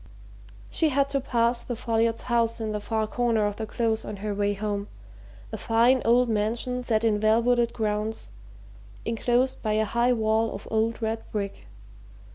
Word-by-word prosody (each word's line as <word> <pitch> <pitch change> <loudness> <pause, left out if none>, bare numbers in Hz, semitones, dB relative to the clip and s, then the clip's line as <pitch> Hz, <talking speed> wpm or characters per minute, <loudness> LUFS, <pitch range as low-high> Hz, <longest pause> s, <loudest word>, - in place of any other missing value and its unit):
She 320 - +2
had 280 0 +1
to 275 -1 0
pass 235 -1 +1
the 240 - -5
Folliots' 230 0 0
house 235 -1 +1
in 220 -1 -2
the 210 - -2
far 220 +1 -1
corner 230 -1 +1
of 205 0 -2
the 220 - -4
Close 225 -1 -1
on 210 - -6
her 205 +1 -4
way 205 0 0
home 205 0 -3 0.6
a 220 - -5
fine 235 +3 +3
old 245 +2 +4
mansion 230 +3 -1
set 225 -3 0
in 215 -2 +2
well 215 +1 +4
wooded 240 -1 +2
grounds, 215 0 -2 0.7
enclosed 240 +3 0
by 215 -2 0
a 220 0 +2
high 235 +3 +2
wall 220 0 +1
of 200 - -9
old 225 +1 0
red 225 0 -1
brick. 200 -2 -4
225 Hz, 175 wpm, -26 LUFS, 215-240 Hz, 0.7 s, old